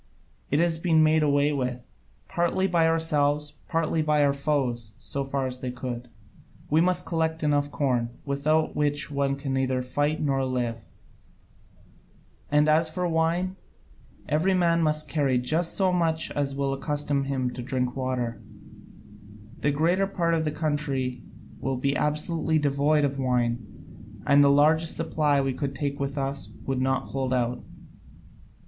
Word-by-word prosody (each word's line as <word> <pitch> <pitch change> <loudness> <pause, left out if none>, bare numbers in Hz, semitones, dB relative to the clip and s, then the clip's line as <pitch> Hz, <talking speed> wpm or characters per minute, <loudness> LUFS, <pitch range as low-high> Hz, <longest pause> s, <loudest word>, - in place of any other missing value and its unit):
It 145 - +1
has 170 -1 +2
all - - -12
been 160 -3 +4
made 155 0 +4
away 145 0 +2
with, 125 -3 -3 0.4
partly 175 +1 0
by 170 -3 +3
ourselves, 150 -2 +1
partly 165 -1 0
by 150 -1 +2
our 140 - +2
foes, 130 -6 -1
so 140 - -3
far 135 0 -2
as 130 -1 -4
they 130 - -4
could. 125 -1 -6 0.6
We 155 +2 +5
must 180 +1 +1
collect 160 -2 -1
enough 145 -1 +1
corn, 125 -5 0 0.2
without 150 +3 +1
which 150 0 0
one 140 -1 0
can 140 -1 -4
neither 130 -1 0
fight 145 +4 -1
nor 135 -3 0
live: 120 -3 -2 1.6
and 150 +1 +3
as 155 +1 +3
for 180 +3 -2
wine, 170 +3 0 0.7
every 165 +6 +2
man 170 -2 +3
must 155 -1 0
carry 140 -5 +1
just 155 +7 0
so 190 -2 +2
much 160 -2 0
as 140 -1 -1
will 140 0 0
accustom 145 0 -1
him 130 -2 -1
to 125 - -6
drink 125 0 -2
water: 125 -4 -2 1.2
the 145 - +1
greater 170 +7 +2
part 170 -4 0
of 160 -1 +1
the 150 - 0
country 145 -5 -1 0.4
will 135 0 -2
be 140 +2 0
absolutely 155 +2 0
devoid 145 +1 +2
of 140 0 -2
wine, 120 -4 -3
and 145 0 +6
the 140 - +5
largest 155 +3 +3
supply 150 -2 +1
we 135 -1 0
could 140 0 -3
take 140 +1 -3
with 140 +1 -3
us 135 0 -3
would 135 -1 -1
not 130 0 0
hold 135 -1 -2
out. 125 -1 0
145 Hz, 155 wpm, -26 LUFS, 130-160 Hz, 1.6 s, and